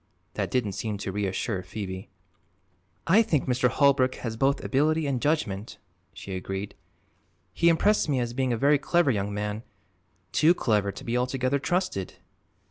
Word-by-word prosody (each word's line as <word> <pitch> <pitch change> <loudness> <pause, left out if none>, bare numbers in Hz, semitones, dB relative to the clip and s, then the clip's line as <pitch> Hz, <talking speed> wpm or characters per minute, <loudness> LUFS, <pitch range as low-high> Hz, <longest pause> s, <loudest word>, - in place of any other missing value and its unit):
That - - -2
didn't 120 -5 0
seem 105 +2 -3
to 100 - -4
reassure 95 0 -2
Phoebe. 95 +1 -6 1.0
"I 195 +7 +5
think 155 -10 0
Mr. 125 0 +2
Holbrook 130 -1 +3
has 115 -2 -5
both 135 +4 +1
ability 155 +3 +1
and 135 -4 -1
judgment," 115 -10 -1 0.3
she 95 - -7
agreed. 95 +2 -5 0.8
"He 170 - +3
impressed 170 +2 +3
me 135 -3 +1
as 120 -1 -2
being 130 0 0
a 120 - 0
very 140 +3 +4
clever 170 +1 +2
young 100 -2 -2
man 105 +1 -3 0.7
too 165 +3 +4
clever 105 - +1
to - - -10
be 115 - -2
altogether 130 +2 0
trusted." 175 - -2
125 Hz, 155 wpm, -26 LUFS, 105-145 Hz, 1.0 s, I